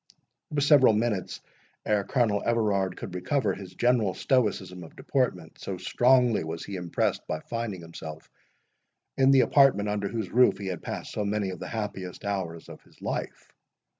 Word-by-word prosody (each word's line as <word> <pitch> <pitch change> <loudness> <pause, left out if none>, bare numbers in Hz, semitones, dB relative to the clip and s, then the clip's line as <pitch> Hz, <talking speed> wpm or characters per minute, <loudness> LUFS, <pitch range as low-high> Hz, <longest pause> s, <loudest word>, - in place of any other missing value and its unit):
It - - -6
was 145 -1 +2
several 140 -6 +6
minutes 105 -3 -1 0.4
ere 105 -1 +2
Colonel 105 -2 +1
Everard 105 -5 +1
could - - -7
recover 95 +4 0
his 95 -1 -10
general 120 -5 +2
stoicism 105 -8 0
of 80 - -13
deportment, 95 - -2
so 95 - -5
strongly 120 +4 +3
was 80 +1 -5
he 100 - -6
impressed 90 -2 -1
by 80 - -2
finding 115 -6 -4
himself 80 -2 -9 0.9
in 135 0 +4
the 135 -1 +6
apartment, 130 -9 +4
under 105 -1 -1
whose 110 -2 -4
roof 120 -5 +5
he 100 - -7
had 90 -3 -4
passed - - -6
so 105 - -2
many 100 -1 -1
of 90 - -8
the - - -6
happiest 100 -5 -5
hours 90 -5 -3
of - - -11
his - - -24
life. - - -5
100 Hz, 170 wpm, -27 LUFS, 90-120 Hz, 0.9 s, several